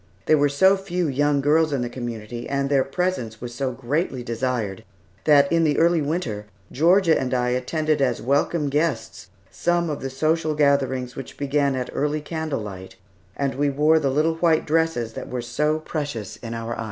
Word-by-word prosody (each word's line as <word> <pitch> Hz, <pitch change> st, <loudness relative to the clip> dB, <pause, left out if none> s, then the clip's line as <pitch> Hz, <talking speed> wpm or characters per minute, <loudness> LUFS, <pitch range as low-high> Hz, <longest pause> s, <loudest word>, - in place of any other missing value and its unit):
There 155 Hz, -, +5 dB
were 145 Hz, 0 st, +3 dB
so 190 Hz, +8 st, +4 dB
few 180 Hz, -3 st, -2 dB
young 145 Hz, +1 st, +1 dB
girls 155 Hz, +2 st, +3 dB
in 140 Hz, -3 st, 0 dB
the -, -, -2 dB
community, 120 Hz, -1 st, -6 dB
and 140 Hz, 0 st, -1 dB
their 135 Hz, -2 st, +4 dB
presence 135 Hz, -8 st, -2 dB
was 120 Hz, 0 st, -7 dB
so 130 Hz, +2 st, -2 dB
greatly 130 Hz, +1 st, -2 dB
desired, 115 Hz, -4 st, -2 dB, 0.4 s
that 145 Hz, -2 st, +5 dB
in 165 Hz, 0 st, +3 dB
the 150 Hz, -3 st, +2 dB
early 170 Hz, 0 st, +3 dB
winter, 140 Hz, -, -3 dB, 0.2 s
Georgia 170 Hz, +3 st, +4 dB
and 130 Hz, -1 st, -1 dB
I 125 Hz, 0 st, +1 dB
attended 150 Hz, +5 st, 0 dB
as 125 Hz, -3 st, +1 dB
welcome 145 Hz, +4 st, +1 dB
guests 140 Hz, -7 st, -2 dB, 0.2 s
some 175 Hz, -1 st, 0 dB
of 145 Hz, -, -5 dB
the 135 Hz, -, -3 dB
social 155 Hz, +3 st, 0 dB
gatherings 135 Hz, -4 st, +1 dB
which 135 Hz, -, -8 dB
began 140 Hz, -1 st, +1 dB
at 125 Hz, -1 st, -3 dB
early 150 Hz, +1 st, 0 dB
candle 160 Hz, -4 st, -3 dB
light, 95 Hz, -3 st, -8 dB, 0.4 s
and 140 Hz, -1 st, -1 dB
we 145 Hz, +2 st, +1 dB
wore 150 Hz, +3 st, +3 dB
the 140 Hz, -3 st, 0 dB
little 155 Hz, +4 st, +1 dB
white 165 Hz, -2 st, +2 dB
dresses 160 Hz, -8 st, 0 dB
that -, -, -7 dB
were 125 Hz, -, -3 dB
so 150 Hz, +6 st, 0 dB
precious 145 Hz, -9 st, -5 dB
in 115 Hz, 0 st, -7 dB
our 115 Hz, 0 st, -4 dB
eyes. -, -, -10 dB
140 Hz, 190 wpm, -23 LUFS, 125-155 Hz, 0.4 s, There